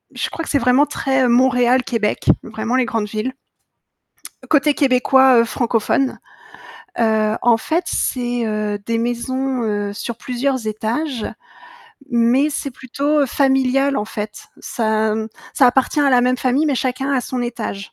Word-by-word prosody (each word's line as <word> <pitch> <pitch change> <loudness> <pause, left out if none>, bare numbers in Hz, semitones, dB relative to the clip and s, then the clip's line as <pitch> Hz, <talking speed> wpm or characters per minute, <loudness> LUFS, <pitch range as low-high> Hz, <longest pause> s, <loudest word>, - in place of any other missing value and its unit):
je - - -2
crois 330 - -5
que - - -8
c'est 280 - +2
vraiment 250 +4 +4
très 265 -3 0
Montréal, 250 +1 +3
Québec, 225 -4 -2 0.2
vraiment 220 +2 -3
les 260 - +2
grandes 225 -3 -2
villes. 220 +5 -3 1.2
Côté 295 -1 +3
québécois, 260 -2 +4
heu, - - +3
francophone. 235 +3 0 0.8
Heu, 220 -1 +2
en 235 -2 +4
fait, 330 +9 -1
c'est, 245 -2 -1
heu, 215 -1 -2
des 230 0 -1
maisons, 255 +2 -2
heu, 205 -2 -2
sur 230 +2 -6
plusieurs 255 0 -2
étages, 230 +4 -3 0.9
mais 240 +5 +3
c'est 280 - -4
plutôt, 280 +4 -1
heu, - - +1
familial, 270 +1 +2
en 210 - -2
fait. 210 -1 -7
Ça 220 -1 0
m 220 0 -3 0.2
ça 260 - +4
appartient 265 +4 +2
à 285 - +3
la 250 -1 +5
même 250 0 +1
famille, 260 +4 +1
mais 280 - +1
chacun 260 +2 -2
a 260 - +2
son 250 0 -4
étage. 235 -4 -4
245 Hz, 155 wpm, -19 LUFS, 225-265 Hz, 1.2 s, la